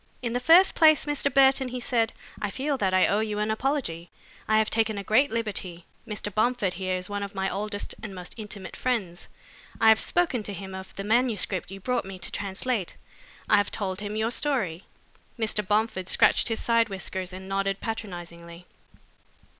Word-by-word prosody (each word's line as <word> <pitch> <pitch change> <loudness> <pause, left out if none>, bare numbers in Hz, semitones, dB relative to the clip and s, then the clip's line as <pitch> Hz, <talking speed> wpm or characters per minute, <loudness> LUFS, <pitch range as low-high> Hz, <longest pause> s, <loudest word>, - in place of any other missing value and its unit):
"In 235 -1 -2
the 245 - +1
first 335 +8 +6
place, 310 -2 +5
Mr. 290 -1 0
Burton," 265 0 +5
he 250 0 -4
said, 235 -2 +1 0.3
"I 210 - -1
feel 275 +7 -1
that 195 -8 0
I 185 0 +4
owe 205 - +2
you 215 -1 -2
an 210 +1 0
apology. 220 - -2 0.4
I 215 - +4
have 220 0 +2
taken 220 -2 +2
a 200 - -4
great 255 +8 +3
liberty. 195 -6 -4 0.2
Mr. 210 -2 -5
Bomford 220 -3 +1
here 185 0 -2
is 180 0 -6
one 205 0 -4
of 200 0 -6
my 190 0 0
oldest 205 +1 -3
and 210 -3 -7
most 180 -1 -7
intimate 205 -4 -7
friends. 200 -9 -2 0.5
I 225 - +6
have 220 0 +6
spoken 340 -9 +1
to 205 -1 -5
him 190 0 -7
of 190 0 -8
the 195 - -5
manuscript 215 -4 0
you 195 +1 -8
brought 250 +3 -1
me 195 -1 -7
to - - -4
translate. 200 +1 -2 0.5
I - - +5
have 205 -1 +2
told 190 -2 -3
him 205 0 -4
your 220 +2 0
story." 210 - -1 0.5
Mr. 220 -2 0
Bomford 210 -3 0
scratched - - +4
his 225 -2 -1
side 230 -1 +3
whiskers 190 -1 -4
and 190 +1 -9
nodded 195 0 -1
patronizingly. 175 -6 -7
210 Hz, 190 wpm, -26 LUFS, 190-235 Hz, 0.5 s, first